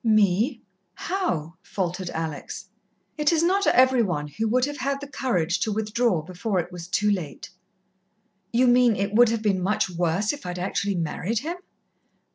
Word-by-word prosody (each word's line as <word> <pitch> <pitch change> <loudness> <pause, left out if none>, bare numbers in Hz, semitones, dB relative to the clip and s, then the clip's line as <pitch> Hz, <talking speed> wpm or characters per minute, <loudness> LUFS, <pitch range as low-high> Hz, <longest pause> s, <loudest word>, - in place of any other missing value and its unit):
"Me 215 +3 +2 0.3
how?" 180 - -2
faltered 180 -1 -3
Alex. 160 -2 -5 0.5
"It 300 +1 +3
is 330 -1 +2
not 385 +3 +2
every 255 -1 +5
one 170 -8 -1
who 195 +10 -2
would 250 +3 +2
have 290 0 -5
had 275 +1 -1
the 285 - -7
courage 185 - 0
to 220 - 0
withdraw 215 -4 0
before 185 +4 -3
it 175 +1 -4
was 175 -1 -8
too 210 +3 +1
late." 175 -8 -4 1.0
"You 245 +2 +3
mean, 245 -2 +5
it 200 +1 -2
would 240 +1 +6
have 225 -1 -1
been 195 -3 +1
much 195 0 0
worse 175 - 0
if 290 - -9
I'd 180 0 -5
actually 195 +2 -1
married 175 +6 -2
him?" 335 +5 -4
210 Hz, 170 wpm, -25 LUFS, 180-250 Hz, 1.0 s, would